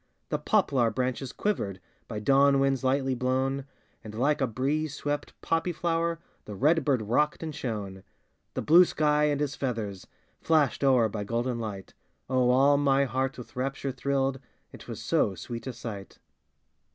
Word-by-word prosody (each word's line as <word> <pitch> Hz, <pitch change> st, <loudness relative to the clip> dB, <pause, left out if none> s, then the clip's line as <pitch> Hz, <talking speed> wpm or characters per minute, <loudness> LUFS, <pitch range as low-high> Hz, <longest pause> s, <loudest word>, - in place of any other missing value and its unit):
The -, -, -1 dB
poplar 140 Hz, -, +2 dB
branches 125 Hz, +3 st, -2 dB
quivered, 100 Hz, -, -2 dB, 0.3 s
By 110 Hz, -, -5 dB
dawn 140 Hz, +5 st, +4 dB
winds 135 Hz, -1 st, +1 dB
lightly 135 Hz, 0 st, +1 dB
blown, 130 Hz, +2 st, -1 dB, 0.4 s
And 110 Hz, -1 st, -9 dB
like 145 Hz, +5 st, +1 dB
a 135 Hz, -, +2 dB
breeze 145 Hz, +6 st, -1 dB
swept 145 Hz, 0 st, -4 dB
poppy 165 Hz, +2 st, 0 dB
flower 170 Hz, 0 st, -1 dB, 0.3 s
The 105 Hz, -, -7 dB
red 155 Hz, -, +3 dB
bird 130 Hz, -7 st, +1 dB
rocked 150 Hz, +10 st, +1 dB
and 160 Hz, -1 st, -4 dB
shone. 100 Hz, -8 st, -5 dB, 0.5 s
The -, -, -2 dB
blue 170 Hz, +4 st, +7 dB
sky, 150 Hz, -3 st, +2 dB
and 145 Hz, -1 st, +1 dB
his 145 Hz, -1 st, -1 dB
feathers 110 Hz, -7 st, -4 dB, 0.3 s
Flashed 155 Hz, -4 st, +2 dB
o'er 130 Hz, -4 st, +4 dB
by 105 Hz, -1 st, -4 dB
golden 120 Hz, +3 st, -2 dB
light, 105 Hz, -4 st, -6 dB, 0.3 s
Oh, 130 Hz, -1 st, +2 dB
all 135 Hz, +3 st, +5 dB
my 140 Hz, -1 st, +3 dB
heart 130 Hz, +2 st, -2 dB
with 125 Hz, +1 st, -11 dB
rapture 135 Hz, +1 st, -2 dB
thrilled, 135 Hz, +1 st, -1 dB, 0.3 s
It -, -, -13 dB
was -, -, -6 dB
so 95 Hz, -, +1 dB
sweet 115 Hz, +8 st, -7 dB
a -, -, -2 dB
sight! 110 Hz, -4 st, -8 dB
135 Hz, 165 wpm, -28 LUFS, 115-145 Hz, 0.5 s, blue